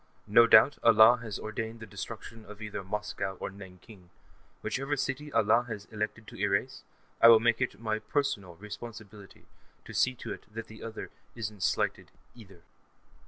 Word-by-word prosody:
No 115 +3 +6
doubt 145 - +6
Allah 115 +1 +7
has 110 -4 -6
ordained 110 +1 -5
the 115 - -8
destruction 110 +2 -8
of 105 0 -12
either 105 -2 -6
Moscow 100 -1 -4
or - - -4
Nanking; 95 0 -14 0.5
whichever 135 +2 -2
city 135 +3 -3
Allah 115 +2 +3
has 105 -3 -6
elected 110 +1 -4
to - - -12
erase, 105 +7 0 0.4
I - - +9
will 115 -1 +9
make 120 +1 +2
it 120 -5 -2
my 110 -1 -2
personal 110 -11 -2
responsibility 105 0 -10 0.4
to - - -10
see 130 0 +2
to - - -6
it - - -14
that 115 +1 -6
the 110 -1 -13
other 115 -1 -7 0.2
isn't 105 -4 -6
slighted, - - 0 0.2
either. 95 -7 -16
110 Hz, 165 wpm, -29 LUFS, 100-115 Hz, 0.5 s, I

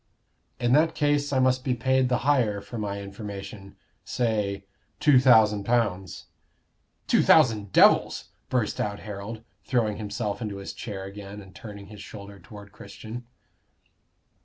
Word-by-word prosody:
"In 120 0 +1
that 160 +3 +3
case 145 -1 +1
I 135 - +1
must 130 0 +2
be 130 -2 0
paid 130 +1 +2
the 125 - +2
higher 120 -8 +2
for 100 +4 -8
my 100 -1 -3
information. 100 0 -8 0.3
Say, 105 -5 -1 0.3
two 145 -4 +6
thousand 110 -5 +5
pounds." 100 -5 -1 0.8
"Two - - +3
thousand 110 -10 +4
devils!" - - +4 0.2
burst 120 -5 0
out 100 -1 -3
Harold, 105 +2 -7 0.2
throwing 110 -5 0
himself 105 -1 -4
into 105 -3 -4
his 100 - -7
chair 100 -5 -6
again, 100 +1 -9
and 95 -2 -13
turning 100 -2 -10
his 105 0 -11
shoulder 100 -1 -10
toward 100 +1 -13
Christian. 115 +4 -10
105 Hz, 140 wpm, -26 LUFS, 100-125 Hz, 0.8 s, two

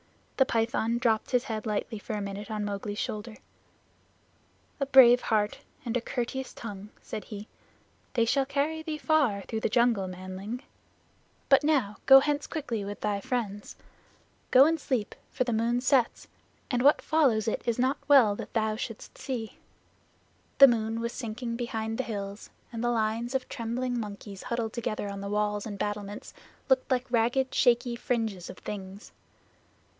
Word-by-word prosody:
The 265 - +5
Python 230 0 0
dropped 230 -3 +1
his 250 -1 +2
head 220 -3 -4
lightly 210 +1 -2
for 220 - -6
a 210 - -2
minute 200 +1 -6
on 210 -1 -2
Mowgli's 205 0 -4
shoulder. 215 +1 -4 1.4
"A 275 - 0
brave 250 -2 +8
heart 210 -2 0 0.3
and 235 0 -2
a 245 - +1
courteous 255 +2 -3
tongue," 205 -3 -8
said 215 - -7
he. 210 0 -8 0.7
"They 230 -2 +3
shall 270 +3 +1
carry 295 +3 -1
thee 315 -1 -4
far 290 -11 +2
through 220 - -4
the - - 0
jungle, 235 -4 +2
manling. 185 +6 -6 0.8
But 275 +1 +5
now 265 -10 +1
go 270 0 +11
hence 290 +1 -1
quickly 250 -10 -3
with 205 +1 -6
thy 205 -1 -1
friends. 205 -4 -3 0.7
Go 260 +2 +8
and 325 +1 +2
sleep, 250 -8 -2 0.2
for - - 0
the 240 -2 -2
moon 230 +2 +1
sets, 255 -1 +1 0.4
and 245 -1 +1
what 285 +3 +5
follows 260 -10 +2
it 220 - 0
is 235 - +1
not 260 +3 +1
well 255 -8 +6
that - - -8
thou 220 -1 +1
shouldst 225 0 -7
see." 240 -5 -5 1.0
The 275 - +11
moon 225 -2 0
was 235 +1 -3
sinking 230 0 -4
behind 225 -2 -3
the - - +1
hills 200 -3 -6 0.2
and 230 0 -4
the 240 - +2
lines 230 +2 -1
of 260 - -1
trembling 245 0 -2
monkeys 205 -2 -7
huddled 235 -2 -3
together 215 -3 -3
on 200 0 -5
the 200 - -5
walls 210 0 -1
and 205 -2 -6
battlements 205 0 -4 0.3
looked 265 -2 +2
like 250 -1 +1
ragged 245 +3 +1
shaky 240 -1 +3
fringes 225 -7 -2
of - - -9
things. 195 0 -8
230 Hz, 165 wpm, -28 LUFS, 210-255 Hz, 1.4 s, go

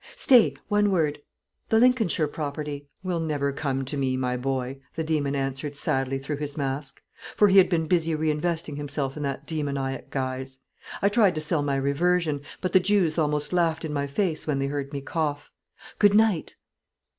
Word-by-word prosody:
"Stay; 250 -5 +5
one 205 -1 +3
word. 155 -6 0 0.5
The 220 - +4
Lincolnshire 225 -10 +3
property 145 -1 -5
" - - -45
"Will 180 -2 -1
never 145 -3 -1
come 135 -2 -2
to 140 - -4
me, 130 -2 0
my 125 -1 -1
boy," 130 +1 -2 0.2
the 160 - -1
demon 150 -3 0
answered 135 +1 -3
sadly, 135 -1 0
through 140 +2 -4
his 145 0 -5
mask; 140 0 -3 0.4
for 210 - +5
he 195 +1 +7
had 185 - +5
been 165 -3 +1
busy 165 -1 +1
re 155 0 +1
investing 155 -1 -2
himself 145 -2 -3
in 150 - -6
that 140 0 -3
demoniac 140 -4 -3
guise. 130 0 -4 0.5
"I 200 - +5
tried 205 -4 +3
to 155 - -2
sell 155 0 0
my 140 -1 0
reversion, 150 +2 +1 0.2
but 185 - -2
the 185 - +7
Jews 180 -4 +2
almost 150 0 0
laughed 165 -2 +1
in 150 - -4
my 140 -1 -1
face 160 +2 -1
when 150 -3 +1
they 135 - 0
heard 140 0 -3
me 140 -2 -4
cough. 145 0 -3 0.5
Good 205 -1 +5
night." 215 -6 +2
150 Hz, 190 wpm, -26 LUFS, 140-170 Hz, 0.5 s, he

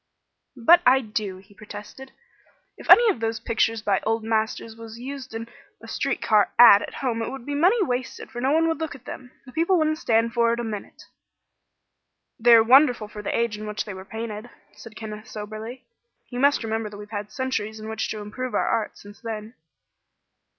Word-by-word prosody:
"But 335 +9 +6
I 265 -1 +5
do," 210 -4 -4
he 195 +2 -18
protested. 210 +5 -11 0.6
"If - - -13
any 475 - +9
of 245 - -6
those 225 0 -2
pictures 225 -1 0
by 200 -3 +2
old 225 0 -1
masters 220 0 -2
was 225 0 -10
used 265 -1 -7
in 230 0 -5 0.3
a - - -13
street - - -2
car 210 -2 +3
'ad' 210 -4 +9
at - - -7
home 230 -3 0
it - - -2
would 270 -3 -8
be 290 - -4
money 360 +11 +3
wasted, 250 -6 -4
for 240 - -6
no 265 +2 +1
one 325 +2 +3
would 325 0 -1
look 320 -3 -4
at 250 -2 -15
them. 250 0 -8 0.2
The 255 - -12
people 335 +6 +2
wouldn't 310 -1 +1
stand 230 0 +1
for 235 -1 +3
it 235 - -3
a - - -2
minute." 215 -3 -7 1.4
"They 235 +1 +7
are 225 - +7
wonderful 245 -3 +5
for 210 - -8
the 210 - -2
age 230 -3 -1
in 215 - -6
which 210 0 -3
they 205 - -6
were 190 0 -9
painted," 220 +2 -6 0.2
said 225 -2 -13
Kenneth, 215 -1 -8
soberly. 215 +4 -8 0.4
"You 245 - -5
must 280 -1 +3
remember 220 -1 -2
that 205 - -10
we 210 - -8
have 210 - -16
had 210 0 -5
centuries 220 -4 -3
in 215 - -8
which 220 0 -3
to 215 - -4
improve 250 +5 -5
our - - +1
art, 220 -2 -1
since 205 +1 -14
then." 220 -1 -6
225 Hz, 210 wpm, -24 LUFS, 215-255 Hz, 1.4 s, any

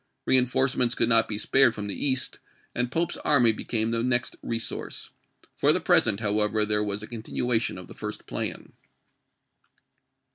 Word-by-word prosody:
Reenforcements 130 -1 +2
could 115 - +1
not 115 -1 +4
be 105 - -3
spared 125 +1 +3
from 105 - -5
the 100 - -4
East, 130 -2 0 0.3
and 125 0 -2
Pope's 165 +3 -1
army 125 -6 +4
became 110 +1 -2
the 115 0 -1
next 120 0 0
resource. 115 0 -4 0.4
For - - +3
the - - +2
present, 105 -1 +3
however, 105 0 +1
there 105 0 +1
was 105 0 -3
a - - -7
continuation 115 -1 -2
of 90 - -10
the - - -11
first - - -7
plan. - - -5
115 Hz, 155 wpm, -26 LUFS, 105-125 Hz, 0.4 s, not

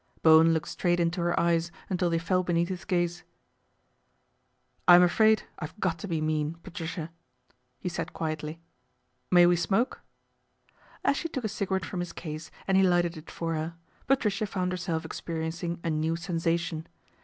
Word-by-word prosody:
Bowen 160 +1 +7
looked 160 -2 0
straight 175 -1 0
into 170 +1 0
her 175 0 +1
eyes 170 0 +2 0.2
until 180 -1 0
they 165 - +1
fell 180 +2 +1
beneath 175 -1 0
his 185 -1 -5
gaze. 175 -2 0 0.8
" - - -44
I'm 175 0 +9
afraid 220 +4 +4 0.2
I've 155 +6 -7
got 170 -4 0
to 205 - -6
be 165 -4 -1
mean, 155 0 -1
Patricia," 165 -2 -5 0.7
he - - -5
said 165 -2 -3
quietly. 155 0 -4 0.4
" 125 0 -46
May 175 - +9
we 175 0 +5
smoke? 200 +8 0 0.5
" - - -29
As 280 - +3
she 330 - -3
took 265 -5 -4
a - - +1
cigarette 195 -3 -2
from 185 - -5
his 175 -1 -4
case 155 0 -6 0.2
and 190 -1 +3
he - - +6
lighted 175 -2 +3
it 155 0 -10
for 165 -1 -3
her, 160 +1 -3 0.3
Patricia 220 -6 +1
found 185 -2 -1
herself 175 -3 -2
experi 160 0 -4
encing 170 +1 -4
a 165 - 0
new 155 +1 0
sensation. 165 -1 -1
170 Hz, 180 wpm, -28 LUFS, 165-185 Hz, 0.8 s, I'm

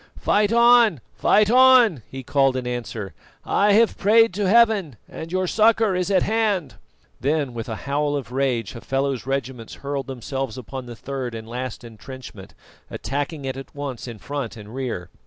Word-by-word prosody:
"Fight 205 0 +2
on! 235 - +5
Fight 210 0 +3
on!" 250 - +6
he 135 0 -8
called 135 0 +2
in 125 - -4
answer. 115 -6 -5 0.3
"I 205 0 +3
have 225 +2 +3
prayed 225 +1 +4
to 200 -1 0
Heaven, 215 - +3
and 165 +1 -8
your 185 0 0
succour 220 0 +3
is 180 +1 -1
at 190 -2 +3
hand." 210 -7 0 0.5
Then, 140 0 -1
with 115 0 -6
a 110 - -3
howl 145 +1 0
of 130 -5 -5
rage, 125 -5 -1
Hafela's 135 +1 -2
regiments 130 -4 -4
hurled 140 -1 -3
themselves 135 -1 -5
upon 130 +1 -7
the 120 - -8
third 130 +1 -5
and 110 0 -8
last 125 +1 -6
entrenchment, 115 -3 -11 0.3
attacking 145 +1 -4
it 130 -1 -3
at 135 +2 -10
once 140 -4 -6
in 120 -2 -7
front 135 -1 -5
and 105 +1 -11
rear. 125 -10 -5
135 Hz, 170 wpm, -22 LUFS, 125-195 Hz, 0.5 s, on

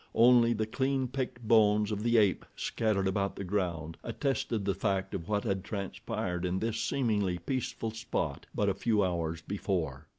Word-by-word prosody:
Only 120 0 +6
the 110 -1 -1
clean 130 +3 0
picked 125 -3 -4
bones 105 -2 +4
of 105 -1 -2
the 120 +1 +3
ape, 100 -4 +3
scattered 105 -4 0
about 100 +1 0
the - - -5
ground, 85 -4 -2
attested 115 -4 -1
the 100 - +2
fact 95 -1 -1
of 90 +1 -5
what 105 -1 +1
had 95 -1 -1
transpired 95 -3 -3
in 90 +1 0
this 110 +2 -1
seemingly 105 -9 +1
peaceful 115 +3 -3
spot 115 +1 -3
but - - +1
a - - +3
few 110 -3 +1
hours 85 -2 -2
before. 95 -2 -2
105 Hz, 170 wpm, -31 LUFS, 95-115 Hz, -, Only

